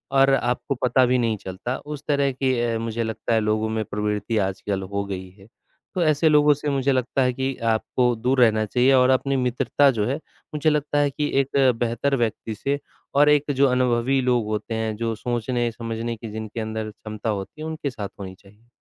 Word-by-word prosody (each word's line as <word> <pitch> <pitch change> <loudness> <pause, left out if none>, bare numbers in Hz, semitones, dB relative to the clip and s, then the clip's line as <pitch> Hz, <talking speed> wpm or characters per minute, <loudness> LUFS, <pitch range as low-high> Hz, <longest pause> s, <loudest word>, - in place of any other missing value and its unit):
और 135 0 +5
आपको 125 +1 0
पता 125 +1 +4
भी 125 +1 +2
नहीं 115 -3 0
चलता, 95 +7 -5
उस 150 -1 -8
तरह 140 -2 +2
की 130 -1 0
अ, 115 -1 0
मुझे 115 0 -2
लगता 110 +1 -2
है 110 - +4
लोगों 110 +1 0
में 110 0 -1
प्रवृत्ति 105 +2 -2
आजकल 95 0 -1
हो 100 +1 -3
गई 95 -2 -6
है। 95 - -16 0.5
तो 180 - +2
ऐसे 155 0 +3
लोगों 150 -1 +5
से 145 +1 -4
मुझे 140 -1 +1
लगता 130 +1 0
है 125 - +1
कि 130 +1 -2 0.2
आपको 125 +2 +1
दूर 125 +4 0
रहना 110 -2 +4
चाहिए 125 +5 +3
और 130 0 +5
अपनी 135 +1 +2
मित्रता 125 +2 +2
जो 110 -4 -1
है, 130 - 0 0.4
मुझे 150 +1 +2
लगता 150 -1 0
है 145 -1 +3
कि 150 +2 -2
एक 135 +1 -3 0.2
बेहतर 120 +4 0
व्यक्ति 115 -2 -2
से 140 +6 -2 0.4
और 145 +1 +6
एक 150 0 +3
जो 140 +1 +4
अनुभवी 125 +1 +2
लोग 125 -3 +1
होते 110 +1 -3
हैं 110 -1 -2
जो 115 0 -1
सोचने-समझने 115 0 -2
की 115 -1 -8
जिनके 110 +1 -6
अंदर 110 0 -4
क्षमता 110 +1 -6
होती 105 +8 -4
है 155 - -4
उनके 155 -2 -3
साथ 110 -7 -6
होनी 95 -1 -7
चाहिए। 105 +4 -22
120 Hz, 205 wpm, -23 LUFS, 110-135 Hz, 0.5 s, और